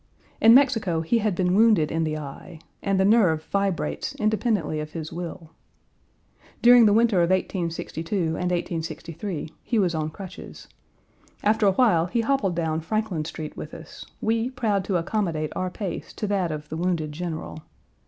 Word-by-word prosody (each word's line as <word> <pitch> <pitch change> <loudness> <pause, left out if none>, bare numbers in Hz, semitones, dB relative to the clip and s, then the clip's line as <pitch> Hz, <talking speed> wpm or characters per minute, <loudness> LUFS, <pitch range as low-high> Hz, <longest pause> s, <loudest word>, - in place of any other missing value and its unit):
In 225 +1 +8
Mexico 225 -11 +3
he 230 +9 +1
had 210 -3 0
been 180 0 +1
wounded 210 -7 +4
in 165 0 0
the 155 0 -2
eye, 150 +3 -9 0.2
and 195 -1 0
the 190 - +4
nerve 190 -8 +4
vibrates 200 -3 -1
independently 215 -7 0
of 150 0 -6
his 160 -1 -6
will. 170 -1 -7 1.1
During 240 -1 +8
the - - +4
winter 225 -1 +3
of 170 - +2
1862 170 -1 -2
and 170 +1 -1
1863 165 0 -4
he 235 - -1
was 185 -5 +2
on 155 -1 -1
crutches. 185 +3 -10 0.8
After 215 0 +3
a 195 - +4
while 185 -8 +3
he 230 +6 0
hobbled 225 -7 0
down 160 -1 -1
Franklin 195 -3 -2
Street 155 -1 -6
with 150 - -8
us, 160 - -10 0.2
we 225 +2 0
proud 220 -7 0
to 190 -3 +1
accommodate 170 -4 -2
our 185 - -1
pace 190 +1 -6
to - - -4
that 195 -5 0
of 150 0 -6
the 160 - -4
wounded 170 -3 -1
general. 160 -1 -5
180 Hz, 165 wpm, -25 LUFS, 160-215 Hz, 1.1 s, In